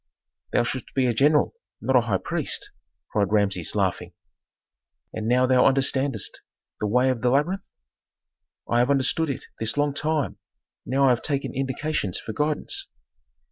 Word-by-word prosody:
"Thou - - +3
shouldst 125 +1 -5
be 130 -1 +3
a 120 - +2
general, 145 +6 +3 0.3
not 130 - 0
a 125 - +7
high 110 -5 0
priest!" 95 - -2 0.4
cried 100 -2 +1
Rameses, 100 -5 +1
laughing. - - -1 1.0
"And 110 0 -4
now 125 +2 +4
thou 125 -1 +5
understandest 135 -3 0 0.4
the 105 - -1
way 125 +5 +3
of 120 -3 -3
the 125 - +2
labyrinth?" 165 +9 0 1.0
"I 120 - +2
have 125 +2 +3
understood 140 +3 +2
it 135 - -4 0.2
this 115 +3 -1
long 145 -1 +2
time, 150 0 -1 0.5
now 135 +2 +2
I - - +5
have 120 -2 +2
taken 140 -4 -2
indications 135 - -2
for 110 - -6
guidance." 155 - 0
130 Hz, 155 wpm, -25 LUFS, 115-140 Hz, 1.0 s, a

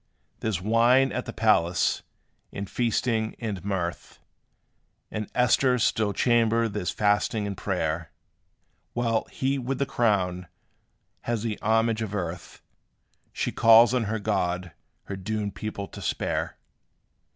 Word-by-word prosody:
There 110 - -1
's 95 - -1
wine 120 +6 +4
at 125 - -3
the - - -5
palace, 90 -6 +2 0.5
and 100 0 -5
feasting, 115 0 0
and 105 -6 -4
mirth; 95 -4 -3 0.9
In 110 -2 -4
Esther's 125 0 +3
still 110 -2 +1
chamber 115 +1 +2
there 105 -2 -4
's - - -1
fasting, 105 +1 +1
and 100 -1 -3
prayer; 85 -5 -2 0.8
While 115 -2 0
he 135 +1 -1
with 130 +1 -2
the 140 - 0
crown, 95 -8 0 0.8
has 115 -2 -1
the 110 -3 -3
homage 115 +1 +2
of 105 -2 -3
earth, 85 -2 -5 0.7
She - - -2
calls 115 +1 +6
on 125 -3 +1
her 110 +2 -1
God 90 -4 -1 0.3
her 100 - -6
doomed 100 +1 -3
people 100 -1 -5
to - - -10
spare. - - -2
110 Hz, 135 wpm, -26 LUFS, 100-115 Hz, 0.9 s, calls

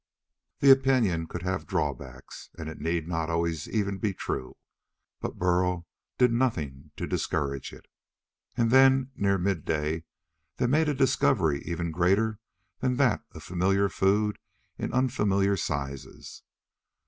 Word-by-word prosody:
The 135 - +8
opinion 125 -11 +3
could 90 +1 -6
have 95 0 -2
drawbacks, 65 0 -4
and 80 - -6
it 80 - -8
need 80 +1 -1
not 85 -2 -1
be 85 - -2
always 85 -2 -1
even 100 -3 -1 0.2
true, 65 - -4 0.6
but - - -5
Burl 90 -1 +1 0.3
did 125 -2 +4
nothing 80 - -1
to - - -3
discourage 70 -2 -2
it. - - -14 0.7
And 115 -1 +2
then, 135 0 +5
near 100 -1 +2
midday, 80 -4 -1 0.5
they 125 - +1
made 150 +5 +3
a 145 - 0
discovery 80 - +2
even 85 -1 -3
greater 100 +6 +1 0.4
than 125 -1 0
that 125 -4 +2
of - - -10
familiar 95 +3 +1
food 105 +3 +1 0.4
in - - -4
unfamiliar 105 -6 +2
sizes. 70 -5 -5
95 Hz, 135 wpm, -27 LUFS, 80-115 Hz, 0.7 s, The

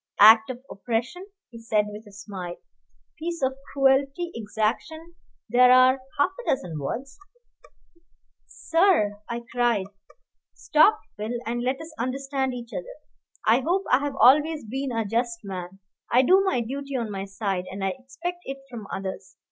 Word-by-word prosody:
"Act 220 +2 +8
of 255 0 -6
oppression," 245 - -3 0.2
he 230 - -10
said, 215 -2 +1
with 210 +1 -10
a - - -13
smile 195 -3 -7 0.6
"piece 335 -1 -4
of 265 0 +1 0.2
cruelty, 275 +5 +2
exaction 230 +10 -3 0.3
there 250 +2 +6
are 255 +1 +6 0.2
half 285 +6 +3
a - - -4
dozen 175 - -1
words 260 - -5 0.8
" 335 0 -38 0.2
"Sir 330 - +4
" - - -30
I 235 0 -4
cried. 240 -5 +1 0.7
"Stop, 415 +8 +4 0.2
Phil, 220 +3 -3
and 240 +2 -2
let 260 +3 -1
us 320 0 -9
understand 265 +1 -2
each 240 -1 -9
other. - - -6 0.5
I 225 +3 +5
hope 355 +8 0
I 255 - +6
have 285 -1 -3
always 300 +2 +5
been 265 +4 -3
a 225 -2 -1
just 230 +2 -1
man. 185 -1 -7 0.3
I 250 +2 +5
do 375 +8 +5
my 380 -11 +1
duty 275 +4 -5
on 230 -4 -2
my 195 -1 -4
side, 195 -2 -3
and 195 +1 -6
I 190 - 0
expect 300 +7 -6
it 270 0 -5
from 220 -4 -8
others. 190 0 -6
250 Hz, 165 wpm, -25 LUFS, 215-280 Hz, 0.8 s, Act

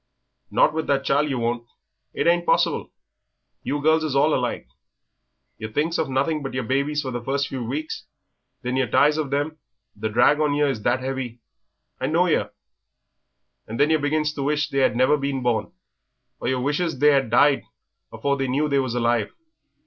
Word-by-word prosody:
"Not - - +3
with 160 0 -2
that 135 -1 +1
child 145 +2 +1
yer 135 - -1
won't 120 0 -2 0.4
it - - -2
ain't 175 0 +3
possible.... - - +1 0.7
You 145 - -2
girls 160 +1 +3
is 150 -3 -2
all 150 +3 +4
alike, 125 -1 -1 0.9
yer 110 - -4
thinks 155 +7 0
of 155 -4 -1
nothing 140 +4 0
but 135 -2 -5
yer 130 - -1
babies 140 +5 0
for 130 - -4
the 120 -1 -4
first 140 +2 -1
few 130 -3 -4
weeks, 145 +7 -5 0.6
then 125 +1 -1
yer 130 -2 +1
tires 150 +6 +3
of 150 -3 -2
them, 145 +3 -2 0.4
the 110 +1 -3
drag 120 +7 +4
on 150 -2 +1
yer 145 0 +2
is 130 -6 -2
that 125 +4 0
'eavy 130 -3 -4 0.6
I 130 - -1
knows 170 +3 +2
yer - - +1 1.2
and 115 +2 -6
then 145 +2 +4
yer 155 - +3
begins 150 +1 0
to 145 - -5
wish 145 +1 0
they 135 - 0
'ad - - +2
never 130 +4 +3
been 140 -2 -2
born, 120 -3 0 0.7
or - - -4
yer 130 0 0
wishes 150 +4 -1
they 150 +3 +5
had 135 -4 +2
died 135 +4 +4 0.5
afore 140 0 -1
they 135 -1 -1
knew 140 +4 +1
they 140 -1 +2
was 130 -3 -2
alive. 120 -2 +1
140 Hz, 195 wpm, -23 LUFS, 125-150 Hz, 1.2 s, they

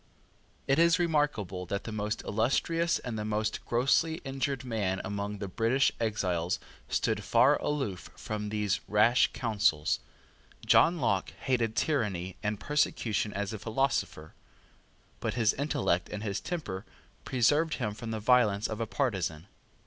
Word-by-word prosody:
It 135 +3 +2
is 170 0 +5
remarkable 145 - 0
that 100 +3 -3
the 115 - -6
most 105 0 -3
illustrious 165 +10 +1
and 115 -3 -5
the - - -2
most 110 0 -2
grossly 140 +7 +2
injured 135 -1 -2
man 100 -6 -1
among 100 0 -3
the 100 0 -5
British 115 +8 +2
exiles 90 -6 0 0.3
stood - - 0
far - - +4
aloof 135 -11 -2
from 105 -1 -4
these 105 -1 0
rash 105 +4 +4
counsels. 100 - +1 0.7
John 170 +2 +5
Locke 100 - 0
hated 120 -4 0
tyranny 105 - -1
and 105 -1 -2
persecution 115 -7 0
as 100 +1 -3
a 110 - -5
philosopher; 110 - -1 0.9
but - - -2
his 115 -3 +3
intellect 135 - 0
and 105 0 -5
his 100 -2 -2
temper 105 - -4 0.4
preserved 145 +6 +2
him 105 -5 -2
from 115 +2 -7
the 110 -1 -2
violence 110 -3 +3
of 110 +1 -4
a 115 - -1
partisan. 95 - -1
110 Hz, 140 wpm, -30 LUFS, 100-135 Hz, 0.9 s, is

